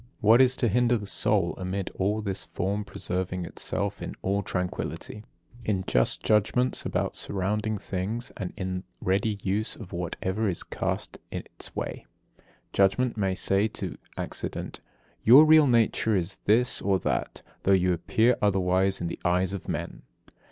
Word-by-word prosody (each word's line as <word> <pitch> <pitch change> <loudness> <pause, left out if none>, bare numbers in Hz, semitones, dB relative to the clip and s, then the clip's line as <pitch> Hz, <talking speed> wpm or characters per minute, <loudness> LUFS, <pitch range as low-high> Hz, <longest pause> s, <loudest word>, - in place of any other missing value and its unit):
What 115 +2 +6
is 130 0 +6
to 120 - +1
hinder 120 +3 +3
the 105 - -7
soul 100 -2 +2
amid 95 +1 -3
all 105 +3 -1
this 100 -2 -1
from 100 +3 -2
preserving 90 -2 -3
itself - - -4
in - - -5
all 100 +2 +1
tranquillity, 95 +3 -4 0.4
in 100 -4 -1
just - - +1
judgments 110 +4 +2
about - - -1
surrounding 105 +3 -1
things, 100 +6 -4
and 95 -4 -4
in 95 -1 -3 0.2
ready 100 +3 0
use 100 +3 -1
of 100 -4 -11
whatever 95 +4 -2
is 85 - 0
cast - - -3
in - - -4
its - - -10
way? - - -5 0.7
Judgment 100 +6 +2
may 95 -3 0
say 100 +3 +1
to - - -6 0.2
accident: - - -5 0.4
"Your 135 +7 +9
real 155 -1 +7
nature 115 -2 +2
is 90 0 -2
this 115 +4 +3
or 100 -1 +2
that, - - -2 0.2
though 100 - +1
you 90 -1 +4
appear 110 +8 +2
otherwise 95 -1 +2
in 85 - -1
the 85 - -5
eyes 90 +2 +1
of 100 - -6
men." - - -4
100 Hz, 155 wpm, -27 LUFS, 95-110 Hz, 0.7 s, Your